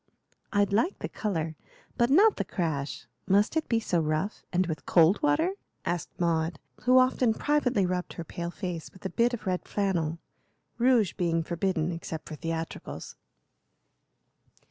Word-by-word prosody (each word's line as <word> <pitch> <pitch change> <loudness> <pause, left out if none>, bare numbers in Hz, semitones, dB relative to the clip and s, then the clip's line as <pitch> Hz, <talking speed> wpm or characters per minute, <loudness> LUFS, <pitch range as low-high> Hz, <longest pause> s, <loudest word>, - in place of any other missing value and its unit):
"I'd 205 -1 +2
like 280 - +2
the - - -4
color, 165 -7 -2 0.4
but 240 0 +2
not 400 +10 +6
the - - 0
crash. 150 -6 -3 0.2
Must 205 +8 +3
it 320 - 0
be 230 - +3
so 180 -6 0
rough, 155 +6 -1
and 185 +1 +2
with 160 -3 -5
cold 170 - +5
water?" 305 +4 +3 0.3
asked 175 -1 -1
Maud, 165 -2 +1 0.3
who 255 +1 +6
often 255 -3 +4
privately 260 -9 +2
rubbed 180 0 -2
her 170 - -6
pale 170 +1 -5
face 175 -3 -5
with 190 - -17
a - - 0
bit 240 +1 +2
of 225 - -12
red 185 -1 -1
flannel, 175 -6 0 0.6
rouge 240 -5 +4
being 165 -2 0
forbidden 170 0 -1
except 165 -2 -6
for - - -7
theatricals. 165 +1 -5
185 Hz, 155 wpm, -28 LUFS, 165-230 Hz, 0.6 s, not